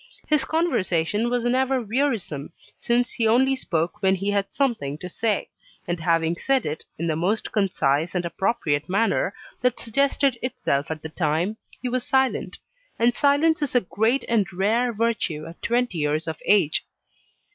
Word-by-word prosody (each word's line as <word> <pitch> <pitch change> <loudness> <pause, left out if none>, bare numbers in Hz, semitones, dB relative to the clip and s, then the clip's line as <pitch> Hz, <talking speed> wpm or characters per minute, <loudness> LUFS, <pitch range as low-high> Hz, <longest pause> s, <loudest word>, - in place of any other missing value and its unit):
His 300 -2 +3
conversation 210 - 0
was 245 -1 0
never 260 +2 +2
wearisome, 225 - -2 0.3
since 240 +1 +1
he 225 - 0
only 260 +4 +4
spoke 170 -9 -2
when 190 0 +3
he 195 +2 -1
had 200 -1 -1
something 225 - -1
to 180 - -7
say; 210 +3 -1 0.4
and 175 0 -2
having 165 0 +1
said 270 +3 +1
it, 150 +1 -4
in 170 - -3
the 160 -2 0
most 185 +7 -1
concise 165 -6 +1
and 180 -1 0
appropriate 170 -5 -1
manner 200 0 +1 0.3
that 250 -1 +1
suggested 275 +1 +1
itself 140 - -1
at 155 -1 -5
the 160 - -5
time, 165 +6 -1 0.3
he - - -1
was 250 0 -1
silent; 265 0 +1 0.4
and 240 +1 +3
silence 295 +3 +3
is 285 -3 -2
a 245 - +5
great 225 +8 0
and 220 -5 +1
rare 220 +7 +1
virtue 220 -9 -1
at 165 +1 -11
twenty 240 -7 0
years 150 +2 0
of 160 -1 -5
age. 195 -7 +3
210 Hz, 165 wpm, -24 LUFS, 165-245 Hz, 0.4 s, a